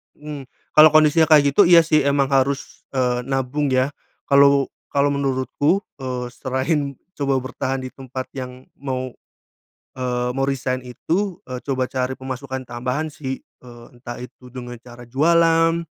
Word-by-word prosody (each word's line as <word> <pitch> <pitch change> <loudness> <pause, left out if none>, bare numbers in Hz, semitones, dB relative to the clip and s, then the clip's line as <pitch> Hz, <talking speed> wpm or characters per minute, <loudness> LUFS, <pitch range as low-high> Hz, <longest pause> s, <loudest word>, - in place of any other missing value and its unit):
Mmm. 150 -3 -8 0.3
Kalau 155 0 +10
kondisi 155 +1 +5
kayak 145 -3 +5
gitu, 205 - +6
iya, 170 -1 +9
sih, 155 -1 +3
emang 140 -1 +2
harus, 135 +1 0
eee, 125 -2 +1
nabung, 135 +2 -1
ya, 130 +2 +2 0.4
kalau 140 -1 +5 0.2
kalau 140 0 +3
menurutku, 140 +6 0 0.2
eee, 125 -2 -4
selain 140 +3 -1 0.2
coba 140 -2 +1
bertahan 130 +1 -3
di 130 - -6
tempat 130 -1 -6
yang 130 -1 -7
mau, 130 -2 -3 0.9
eee, 125 -1 -1
mau 135 0 0
resign, 130 -2 -2
itu, 170 +9 -2
eee, 125 -1 -5
coba 130 -2 0
cari 130 0 -2
pemasukan 130 0 -6
tambahan, 125 +6 -2
sih, 135 -3 -5
eee, 120 -1 -16
entah 120 0 -8
itu 125 0 -12
dengan 120 -2 -7
cara 120 +1 -13
jualan, 165 +3 +3
135 Hz, 145 wpm, -21 LUFS, 130-145 Hz, 0.9 s, Kalau